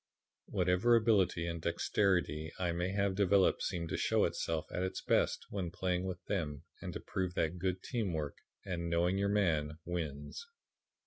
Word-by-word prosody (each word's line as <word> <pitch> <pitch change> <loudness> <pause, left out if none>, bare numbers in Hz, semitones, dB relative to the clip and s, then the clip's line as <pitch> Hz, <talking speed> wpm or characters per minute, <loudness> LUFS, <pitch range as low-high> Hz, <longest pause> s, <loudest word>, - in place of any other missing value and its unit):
Whatever 90 +6 +3
ability 100 -7 +3
and 85 -1 -3
dexterity 85 -2 +1
I 90 -2 0
may 85 +2 -1
have 100 0 +1
developed 100 -1 +3
seemed 85 -2 -2
to - - -1
show - - +3
itself 80 -2 -1
at - - -2
its 95 0 -2
best - - +1
when 95 -4 -2
playing 90 +1 -1
with 90 -2 -5
them 75 -7 -2 0.2
and - - -4
to - - -4
prove 95 -2 -3
that 80 +2 0
good 90 0 -1
team 115 -7 -1
work 75 -3 -3 0.3
and 85 -3 -2
'knowing 90 +3 +2
your 100 0 +2
man' 80 -7 +1
wins. 80 - -4
90 Hz, 170 wpm, -34 LUFS, 85-95 Hz, 0.3 s, Whatever